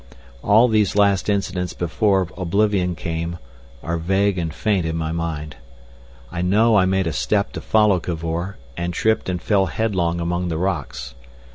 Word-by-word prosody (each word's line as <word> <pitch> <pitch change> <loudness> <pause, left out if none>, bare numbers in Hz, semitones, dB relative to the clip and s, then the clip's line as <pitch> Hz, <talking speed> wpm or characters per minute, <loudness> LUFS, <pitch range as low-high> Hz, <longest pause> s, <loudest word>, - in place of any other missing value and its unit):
All 110 +4 +5
these 110 -4 +2
last 100 -1 +3
incidents 95 -3 -1
before 95 +2 +1
oblivion 95 0 +1
came 85 0 -4 0.5
are 85 0 -2
vague 95 +2 +1
and 80 -2 -2
faint 95 +3 0
in 80 0 -2
my 80 -1 -2
mind. 80 -4 -4 0.7
I 85 - -3
know 105 +5 +3
I 95 -3 +5
made 95 0 +1
a 80 - -1
step 100 +12 0
to - - -5
follow 105 -4 +3
Cavor, 85 +3 -4 0.2
and 85 0 -3
tripped 110 -1 +1
and 90 -1 -1
fell 95 +1 +2
headlong 90 -6 -1
among 85 +1 -1
the 80 -2 -2
rocks. 90 -8 -3
90 Hz, 160 wpm, -21 LUFS, 85-100 Hz, 0.7 s, All